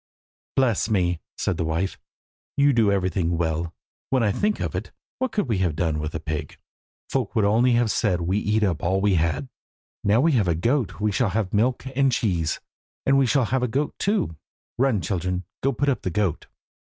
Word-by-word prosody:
"Bless 120 -5 +2
me," 90 -5 +1 0.2
said - - -1
the - - 0
wife, 80 +4 -2 0.6
"you 140 0 +5
do 110 -4 +3
everything 90 -3 0
well! 80 0 -1 0.4
When 130 -3 +2
I 105 - +3
think 210 - 0
of - - -2
it, - - -4 0.3
what 260 0 0
could 205 - -1
we 110 -6 0
have 90 -5 +1
done 80 -2 0
with 75 +1 -4
a - - -2
pig? 75 -2 -5 0.5
Folk 125 -4 -2
would 110 -3 +3
only 120 +4 +4
have 120 -2 +2
said 95 -6 +1
we 95 +5 +1
eat 105 +1 +1
up 90 -6 0
all 95 +3 +1
we 100 0 +2
had. 80 -5 0 0.6
Now 105 +3 +4
we 160 +5 +4
have 110 -9 +2
a 85 - +2
goat 120 - 0
we 105 0 +1
shall 105 +2 +1
have 100 -1 -1
milk 120 +5 +1
and 135 0 +3
cheese, 90 -9 0 0.5
and 135 - +4
we 135 - +3
shall 135 0 +3
have 130 +4 0
the 125 - +1
goat 140 +5 -1
too. 200 - 0 0.4
Run, 125 -7 +2
children, 90 +2 -2 0.2
and 135 -2 0
put 145 - +1
up 140 - +1
the - - -2
goat." 95 -3 -1
105 Hz, 205 wpm, -24 LUFS, 85-125 Hz, 0.6 s, you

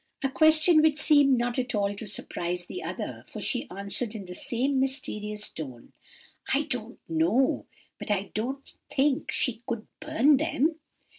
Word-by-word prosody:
"A 270 - +2
question 315 +3 +6
which 310 -1 +3
seemed 290 -4 +5
not 240 +1 -1
at 250 -3 -2
all 200 -1 +1
to 205 +2 -6
surprise 175 -3 -2
the 370 - -7
other, - - -5
for - - -8
she 250 -5 -1
answered, 200 +4 -3
in 200 -3 -6
the 180 - -8
same 260 +8 0
mysterious 210 -6 -2
tone:— 130 -7 -8 0.6
"'I 280 +3 +3
don't 245 -3 -4
know, 170 +11 +1 0.3
but - - -5
I 200 -1 0
don't 265 +6 -3 0.2
think 270 0 +1
she 250 -6 0
could 230 -2 -3
burn 300 -2 +3
them. 315 +1 0
245 Hz, 160 wpm, -27 LUFS, 205-285 Hz, 0.6 s, question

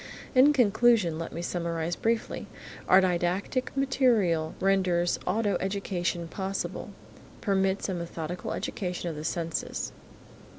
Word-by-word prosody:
In 265 +3 +7
conclusion, 230 - +3
let 165 - -5
me 170 - -5
summarize 170 -1 -2
briefly: 230 0 -1 0.4
Our 190 +1 +8
didactic 185 +7 0
material 230 - +2
renders 185 -3 +2
auto 205 +2 +1
education 185 -3 -2
possible, 190 +3 -4 0.5
permits 195 -1 +1
a 190 - -2
methodical 170 0 -4
education 180 -2 -3
of 160 - -5
the 150 - -6
senses. 165 0 -3
185 Hz, 115 wpm, -28 LUFS, 170-205 Hz, 0.5 s, Our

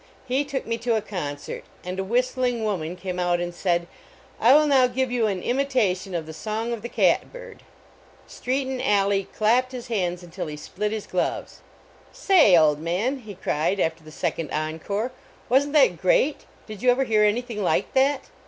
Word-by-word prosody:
He 265 +2 0
took 280 -2 -4
me 230 0 -2
to 235 0 0
a 220 - 0
concert, 150 -9 -5 0.2
and 185 +1 -4
a - - 0
whistling 245 +2 0
woman 180 -6 -2
came 180 -1 -5
out 175 -1 +1
and 175 0 -3
said: 175 -1 0 0.5
I 235 - +5
will 305 0 +5
now 270 -3 +4
give 255 0 -1
you 240 -3 +1
an 190 -3 -3
imitation 240 -9 0
of 165 -2 -2
the 160 - -9
Song 220 +7 -3
of 230 - -5
the 235 - -6
cat - - +2
bird." - - -11 0.7
Strcaton 260 0 -2
Alleigh 200 -1 +2
clapped 245 +4 +2
his 245 -1 -7
hands 180 -5 -1
until 175 0 -6
he 150 -1 -6
split 210 +7 -4
his 215 -2 -4
glove. 180 - -3 0.3
" - - -28 0.2
Say! 315 - +5
old 150 -2 +4
man," 190 - -1
he 215 -5 -10
cried 165 +5 -1
after 165 -1 -1
the 155 - -12
sec - - -2
ond 160 -3 -4
encore, 160 +10 -3 0.4
"wasn 275 +4 +3
t - - -10
that 265 - +4
great? 265 +10 +2 0.2
Did 215 -3 -9
you 250 - +3
ever 250 +2 +3
hear 215 -4 +2
anything 225 +1 0
like 185 - 0
that?" 270 +1 +3
215 Hz, 195 wpm, -24 LUFS, 180-255 Hz, 0.7 s, I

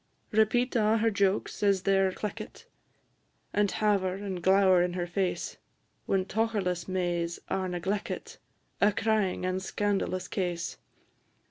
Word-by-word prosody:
Repeat 240 +4 +2
a' 220 -1 +3
her 225 +1 +2
jokes 200 -1 0
as 200 -2 +3
they 195 0 +3
're 190 -1 +3
cleckit, 210 +3 -6 0.9
And 205 -1 +2
haver 195 -4 +1
and 195 -2 -5
glower 190 0 +5
in 175 0 0
her 175 -1 -2
face, 180 +1 -2 0.5
When 190 -1 +1
tocherless 205 -5 -1
Mays 175 -2 -1
are 190 -1 0
negleckit 185 +4 -3 0.4
A 205 +1 +5
crying 210 -4 0
and 185 +1 -1
scandalous 190 -2 -1
case. 175 -3 -3
195 Hz, 130 wpm, -29 LUFS, 180-210 Hz, 0.9 s, glower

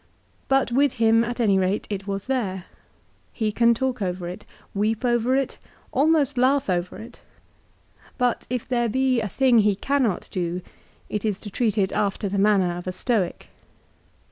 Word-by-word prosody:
But 270 -2 +2
with 275 +2 +3
him 225 -2 +3
at 240 +1 -4
any 200 -5 +3
rate 190 +2 0
it 195 0 -4
was 195 -1 -3
there. 200 -9 -2 0.7
He 220 -2 -1
can 235 +2 +3
talk 255 -1 -2
over 180 -2 -2
it, 180 +4 -8 0.3
weep 215 +4 0
over 240 +1 +2
it, 275 0 -1 0.3
almost 285 -2 +2
laugh 265 -3 +2
over 175 +1 -2
it; 230 +4 -11 1.0
but 245 -2 0
if 250 -1 -3
there 240 -2 +1
be 260 +1 +1
a 215 - -2
thing 255 +3 +3
that - - +7
he 205 -1 +2
cannot 250 -2 0
do 180 -1 -3 0.4
it 210 - -3
is 210 -3 -1
to 205 - -8
treat 220 0 0
it 190 -2 +2
after 200 0 -1
the 195 +1 -1
manner 195 -4 +3
of 175 - -8
a - - -1
Stoic. 190 -1 -1
220 Hz, 175 wpm, -24 LUFS, 195-250 Hz, 1.0 s, that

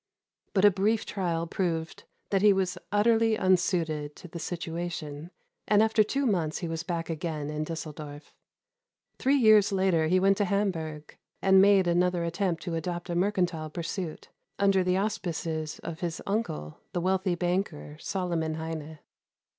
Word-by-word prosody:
But 195 +1 +5
a 205 - +8
brief 210 +4 +1
trial 170 -4 -2
proved 165 -2 -3 0.3
that 195 -1 +2
he 210 -1 +6
was 190 -2 0 0.2
utterly 225 +2 +3
unsuited 170 -6 +1
to - - -11
the 170 0 -8
situation, 165 -2 -5 0.4
and 210 0 +5
after 220 0 +4
two 275 +6 -1
months 170 -9 0
he 175 - -4
was 165 0 -3
back 170 -1 -3
again 155 -2 -3
in 150 0 -2
Düsseldorf. 155 -2 -7 0.9
Three 270 +2 +3
years 215 -6 +6
later 190 -5 +2
he 185 +3 +3
went 195 +1 +3
to 205 - +2
Hamburg, 165 -6 -2 0.2
and 190 0 +6
made 195 -1 +5
another 175 0 +2
attempt 170 0 -1
to 175 - -4
adopt 175 +2 -3
a - - -1
mercantile 180 -4 0
pursuit 170 +1 -5 0.3
under 195 -2 +3
the 180 0 +1
auspices 165 -6 -2
of 165 -1 -6
his 170 -2 -3
uncle, 195 - -3
the 175 - -1
wealthy 185 0 +1
banker 175 -4 -2
Solomon 170 -4 -2
Heine. 160 -1 -5
175 Hz, 155 wpm, -28 LUFS, 160-195 Hz, 0.9 s, a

